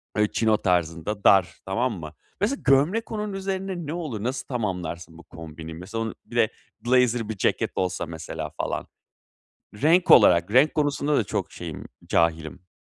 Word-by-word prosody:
Böyle 105 Hz, 0 st, +2 dB
chino 110 Hz, -1 st, +2 dB
tarzında 90 Hz, +3 st, -1 dB
dar, 95 Hz, -2 st, +5 dB
tamam 115 Hz, +6 st, 0 dB
mı? 80 Hz, -2 st, -8 dB, 0.3 s
Mesela 245 Hz, +8 st, 0 dB
gömlek 155 Hz, +12 st, +3 dB
onun 210 Hz, -2 st, -3 dB
üzerine 195 Hz, 0 st, -3 dB
ne 145 Hz, -, -4 dB
olur? 150 Hz, -12 st, -4 dB
Nasıl 125 Hz, +2 st, -3 dB
tamamlarsın 90 Hz, -, -4 dB
bu 85 Hz, -, -13 dB
kombinimi 80 Hz, 0 st, -10 dB
mesela 105 Hz, +6 st, -5 dB
onun 110 Hz, -, -5 dB, 0.2 s
ile 115 Hz, -2 st, +3 dB, 0.4 s
blazer 120 Hz, -2 st, +2 dB
bir 110 Hz, -, -4 dB
ceket -, -, 0 dB
olsa 90 Hz, -1 st, -1 dB
mesela 80 Hz, -1 st, -6 dB
falan. -, -, -3 dB, 0.9 s
Renk 175 Hz, +4 st, +4 dB
olarak 85 Hz, +2 st, +6 dB
renk 135 Hz, +5 st, +5 dB
konusunda 145 Hz, 0 st, +1 dB
da -, -, +2 dB
çok -, -, -3 dB
şeyim, 85 Hz, -4 st, -7 dB, 0.2 s
cahilim. 80 Hz, +1 st, 0 dB
110 Hz, 155 wpm, -25 LUFS, 85-145 Hz, 0.9 s, olarak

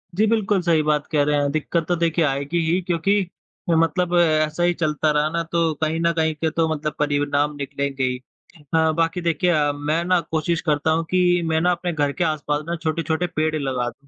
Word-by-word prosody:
जी 210 Hz, +4 st, +3 dB
बिल्कुल, 210 Hz, -3 st, +1 dB
सही 170 Hz, -3 st, +2 dB
बात 150 Hz, -1 st, 0 dB
कह 150 Hz, -3 st, +3 dB
रहे 150 Hz, +1 st, +1 dB
हैं, 140 Hz, 0 st, 0 dB
दिक्कत 155 Hz, +2 st, -1 dB
तो 175 Hz, -, +1 dB
देखिए 165 Hz, -1 st, +1 dB
आएगी 140 Hz, +3 st, -1 dB
ही 180 Hz, +2 st, +1 dB
क्योंकि 175 Hz, +1 st, -1 dB, 0.6 s
ए, 165 Hz, -, +3 dB
मतलब 175 Hz, +2 st, +1 dB
ऐसा 155 Hz, 0 st, +2 dB
ही 175 Hz, 0 st, +3 dB
चलता 155 Hz, -2 st, 0 dB
रहा 150 Hz, +1 st, +1 dB
ना 170 Hz, +1 st, -1 dB
तो 165 Hz, -2 st, +1 dB
कहीं 160 Hz, +1 st, 0 dB
न 170 Hz, 0 st, +2 dB
कहीं 160 Hz, -1 st, +1 dB
के 160 Hz, +2 st, -1 dB
तो 165 Hz, +1 st, 0 dB
मतलब 155 Hz, 0 st, -3 dB
परिणाम 145 Hz, 0 st, 0 dB
निकलेंगे 140 Hz, -1 st, -3 dB
ही। 125 Hz, -1 st, 0 dB, 0.4 s
अ, 160 Hz, +2 st, +1 dB
बाकी 165 Hz, +2 st, 0 dB
देखिए 170 Hz, +1 st, 0 dB
अ, 150 Hz, -3 st, +2 dB
मैं 150 Hz, +3 st, -1 dB
ना 180 Hz, 0 st, +3 dB
कोशिश 160 Hz, +1 st, 0 dB
करता 155 Hz, -1 st, 0 dB
हूँ 165 Hz, +1 st, +1 dB
कि 180 Hz, -1 st, +3 dB
मैं 160 Hz, 0 st, +1 dB
ना 180 Hz, +1 st, +3 dB
अपने 175 Hz, 0 st, -2 dB
घर 145 Hz, -2 st, 0 dB
के 140 Hz, -, -2 dB
आसपास 150 Hz, -2 st, -1 dB
ना 170 Hz, -, -2 dB
छोटे-छोटे 165 Hz, +1 st, -1 dB
पेड़ 155 Hz, 0 st, 0 dB
लगा 130 Hz, -4 st, -2 dB
दूँ। 140 Hz, +3 st, -20 dB
160 Hz, 215 wpm, -22 LUFS, 150-170 Hz, 0.6 s, जी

